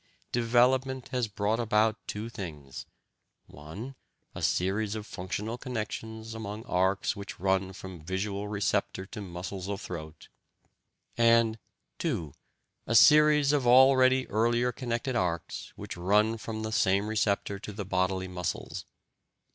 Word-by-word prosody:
development 125 +2 +2
has 125 -3 0
brought 105 +2 -1
about 110 -1 +2
two 105 +2 -4
things: 75 -11 -8 0.6
(1) 85 - -9 0.4
a - - -7
series 100 +4 0
of 105 -1 -5
functional 105 +6 -4
connections 110 -2 -5
among 110 0 -6
arcs 95 0 +1
which 100 -1 -8
run 95 0 +1
from 95 -3 -9
visual 100 +3 -3
receptor 100 -2 -1
to 105 - -8
muscles 95 +1 -6
of 100 -1 -3
throat, 80 -3 -8 0.9
and 115 -1 +4 0.4
(2) 100 - -2 0.5
a 115 - +1
series 150 +2 +7
of 135 -4 +1
already 130 +1 +6
earlier 120 +3 +2
connected 120 +1 -3
arcs 85 -5 -2
which - - -7
run 105 +5 +2
from 110 0 -5
the 110 - -3
same 100 -1 +2
receptor 105 -2 0
to 105 - -7
the 100 -1 -5
bodily 95 0 0
muscles.... 90 -2 -4
105 Hz, 130 wpm, -29 LUFS, 95-120 Hz, 0.9 s, series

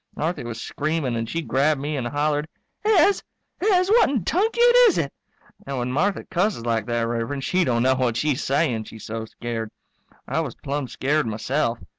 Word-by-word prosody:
Marthy 160 0 -2
was 120 -1 -6
screaming 150 -2 -2
and 115 0 -3
she 165 0 -2
grabbed 145 +1 +1
me 150 +2 -3
and 125 -4 -2
hollered, 145 +2 0 0.4
"Hez! 410 -1 +4 0.4
Hez, 370 -2 +3
what 460 -6 +5
in 255 -9 0
tunket 465 - +3
is 405 - +2
it?" 140 -4 -1 0.5
And 140 -1 -3
when 125 0 -2
Marthy 190 +9 0
cusses 180 - 0
like 115 -2 0
that, 120 -1 0
Rev'rend, 120 +4 -2
she 185 +5 +2
don't 120 -6 +1
know 130 +1 +4
what 125 -3 0
she's 145 -1 0
saying, 125 -5 0
she's 110 -1 -11
so 110 +1 -4
scared. 115 -1 -5 0.6
I - - -1
was - - -3
plumb 140 -1 -3
scared 145 +3 0
myself. 115 +3 -1
140 Hz, 185 wpm, -23 LUFS, 120-170 Hz, 0.6 s, what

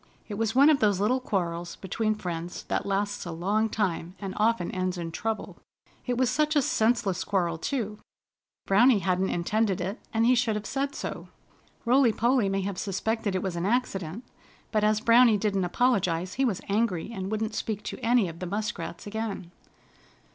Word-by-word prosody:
It 210 - -6
was 220 +2 -1
one 280 +4 +7
of 290 - +3
those 205 -3 +2
little 230 +6 +2
quarrels 175 -7 -2
between 215 +3 -1
friends 175 -3 -5
that - - -1
lasts 200 +1 -1
a 175 - -6
long 205 +7 0
time, 185 -4 -2
and 195 -2 -5
often 215 -4 +1
ends 185 0 -2
in 165 -1 -4
trouble. 220 +6 -4 0.5
It 245 -1 0
was 255 0 +3
such 305 +1 +1
a 290 - +4
senseless 220 -5 +1
quarrel, 175 -5 0
too! 215 - -3 0.7
Browny 230 +5 +5
hadn't 185 0 0
intended 195 +3 0
it, 190 +5 -3
and 225 0 +2
he 250 - +5
should 235 -3 +1
have 210 0 -4
said 275 +3 -2
so. - - -5 0.6
Rolly 250 0 +5
Polly 235 -1 +2
may 195 0 0
have 190 -1 -3
suspected 205 +1 -1
it 185 - -1
was 190 -3 -2
an 170 +2 -1
accident, 205 -4 -1 0.5
but 215 -2 +1
as 215 0 +3
Browny 230 -1 +6
didn't 195 -2 0
apologize 185 -4 +1
he 270 - +1
was 215 -8 -1
angry, 205 -2 0
and 190 -2 -4
wouldn't 215 0 -2
speak 215 -2 -3
to - - -6
any 230 -3 +3
of 165 0 -8
the 180 - -4
Muskrats 210 +4 -4
again. 205 -4 -4
210 Hz, 185 wpm, -27 LUFS, 185-230 Hz, 0.7 s, one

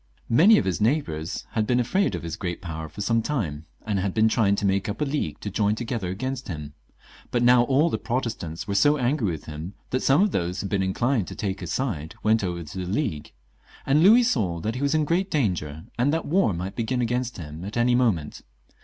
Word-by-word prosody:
Many 185 - +6
of - - +1
his 95 -1 -1
neighbours 105 - -1
had 110 -3 0
been 125 0 +2
afraid 190 +11 +1
of - - -6
his 85 -1 -4
great 85 -1 -4
power 80 -4 -6
for 105 - -8
some 115 +3 +2
time, 85 - -3 0.2
and 105 -2 0
had 95 0 -2
been 110 0 +4
trying 110 -3 +2
to 100 - -2
make 100 +1 +1
up 105 - -4
a 150 - +1
league 140 - -2
to 105 - -4
join 105 +2 +1
to 120 - -4
gether 115 -6 -3
against 130 +7 -4
him; 75 -4 -6 0.6
but 120 -1 0
now 125 0 +6
all 140 +5 +3
the - - -1
Protestants 110 -8 -3
were 100 - -2
so 145 +9 +4
angry 125 -4 +1
with 80 -3 -5
him, 80 +5 -7 0.2
that 130 - +1
some 140 +8 +4
of 210 - +1
those 90 0 -1
who - - -5
had - - -4
been 100 -2 +1
inclined 105 +2 0
to - - -7
take 95 -2 -3
his 90 -3 -5
side 90 - -3
went 110 0 +3
over 85 -2 -3
to 80 +4 -9
the 90 0 -4
League; 95 - -2 0.5
and 140 +3 +3
Louis 220 +8 +7
saw 100 - 0
that 110 +5 -2
he 125 - -5
was 140 +2 +1
in 155 -1 +2
great 180 +5 0
danger, 85 - -1 0.2
and 130 +4 +3
that 165 +1 -1
war 175 - +2
might 90 +2 -4
begin 125 +2 -1
against 120 0 -2
him 80 -1 -8
at 105 +4 -5
any 120 +1 +3
moment. 110 -12 +1
110 Hz, 240 wpm, -25 LUFS, 90-130 Hz, 0.6 s, Louis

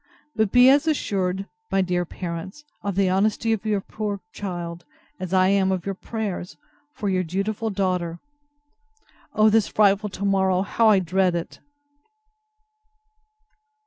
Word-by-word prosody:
But 220 -3 +1
be 250 0 +7
as 285 +4 +5
assured, 195 -10 -1 0.3
my 195 0 +3
dear 180 -1 -1
parents, 175 - -7 0.2
of 200 -2 -3
the 195 -1 +2
honesty 210 +4 +1
of 220 0 -3
your 205 -2 +1
poor 205 0 -4
child, 175 -3 -5 0.4
as 185 -1 -5
I 185 0 +4
am 195 -1 +2
of 185 -2 -2
your 195 - -2
prayers 195 -3 -5 0.4
for 210 - -4
Your 185 -1 +1
dutiful 200 +6 -2
DAUGHTER. 180 -4 -1 1.2
O 215 0 +5
this 220 -1 +3
frightful 205 0 +3
to 200 +1 -5
morrow; 190 -1 +2
how 220 +2 +3
I 210 - +6
dread 185 0 +1
it! 170 0 -5
195 Hz, 145 wpm, -24 LUFS, 185-215 Hz, 1.2 s, be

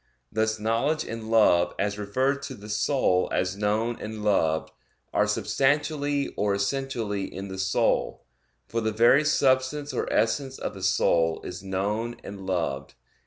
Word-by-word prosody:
Thus 110 0 0
knowledge 115 +9 0
and 115 -1 -6
love 90 -6 +4
as 100 +1 -1
referred 130 +7 0
to - - -6
the 105 +1 -11
soul 105 -4 +1
as 95 +1 0
known 110 +3 0
and 110 0 -6
loved, 80 -6 +1 0.4
are - - +3
substantially 145 0 0
or 100 -1 +1
essentially 105 -2 -2
in 95 +2 -6
the 95 0 -6
soul, 95 0 0 0.4
for 115 - -2
the 110 0 0
very 120 +7 +5
substance 140 0 +1
or - - -2
essence 130 +5 0
of - - -4
the 95 - -10
soul 85 -3 +2
is 90 +1 -7
known 105 +5 -2
and 100 -1 -8
loved. 70 -7 -2
110 Hz, 150 wpm, -26 LUFS, 95-130 Hz, 0.4 s, very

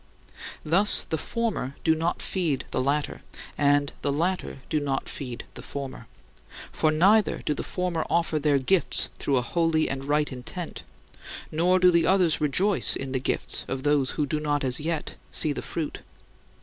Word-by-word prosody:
Thus 190 +7 +5
the 160 - +1
former 215 - -2
do 160 - +4
not 165 +2 -2
feed 165 -8 -1
the - - 0
latter, 145 +3 -1 0.3
and 145 0 +2
the 140 - 0
latter 175 +4 -1
do 155 - 0
not 140 -2 -2
feed 125 -4 -5
the - - -9
former; 130 -4 -7 0.6
for 155 - +1
neither 195 +7 +3
do 150 - +1
the - - -4
former 180 -3 -2
offer 165 -2 +1
their 145 -1 +2
"gifts" 170 +7 +2
through 140 - +1
a 125 - +1
holy 165 +4 +1
and 135 0 -4
right 150 +1 +1
intent, 135 +7 -6 0.7
nor 175 +4 +3
do 180 -1 +5
the 170 -1 +3
others 180 -5 +3
rejoice 185 +7 +3
in 135 -1 -5
the 130 - 0
gifts 130 - -1
of 135 0 -4
those 145 -3 +2
who 150 - +1
do 150 +2 -2
not 145 -1 -1
as 130 -2 +3
yet 160 0 -3
see 150 - +2
the - - -4
"fruit." 160 -3 -5
150 Hz, 175 wpm, -26 LUFS, 140-170 Hz, 0.7 s, Thus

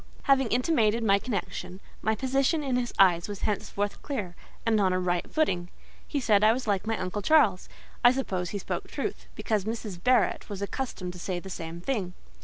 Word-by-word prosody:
Having 270 -2 +4
intimated 235 -2 +2
my 200 -2 +4
connection, 200 -4 -4 0.2
my 220 0 +1
position 270 +5 +1
in 265 -3 0
his 245 -1 -1
eyes 175 -3 +5
was 205 -1 -6
henceforth 205 -1 -2
clear, 205 -11 -4 0.3
and 220 -2 +3
on 190 -2 +3
a 185 - +1
right 175 -1 -1
footing. 180 - 0 0.4
He 290 - -1
said 215 -5 +3
I 215 +1 +6
was 250 +1 -4
like 205 -1 0
my 225 -1 0
uncle 185 +3 -3
Charles: 215 -7 +3 0.3
I 245 - +8
suppose 190 -9 -2
he 205 - -3
spoke 195 - -4
truth, - - -4
because 215 -3 0
Mrs. 215 -5 -5
Barrett 255 -2 +2
was 200 -2 -5
accustomed 200 -5 -4
to 180 - -10
say 180 0 -3
the 190 +2 -9
same 165 0 -6
thing. 190 -6 -2
210 Hz, 195 wpm, -28 LUFS, 185-250 Hz, 0.4 s, I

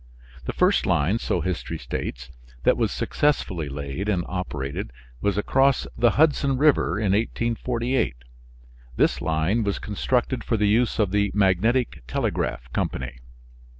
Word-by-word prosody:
The - - -3
first - - +2
line, 110 +4 +2
so 90 - -1
history 90 0 -3
states, 60 +1 -5 0.3
that - - +4
was - - 0
successfully 95 - 0
laid 70 +8 -4
and 90 -4 0
operated 70 -9 -4 0.3
was 100 -1 0
across 135 +5 +2
the 120 - +2
Hudson 140 -3 +3
River 140 - +3
in 105 -2 +1
1848. 115 - 0 0.8
This - - +2
line 80 +8 +1
was 100 -1 -1
constructed 125 +5 -1
for 115 - 0
the 105 0 +2
use 115 +3 +2
of 105 -4 +1
the 100 0 +2
Magnetic 105 - +2
Telegraph - - -2
Company. 65 -1 -3
100 Hz, 135 wpm, -24 LUFS, 80-120 Hz, 0.8 s, that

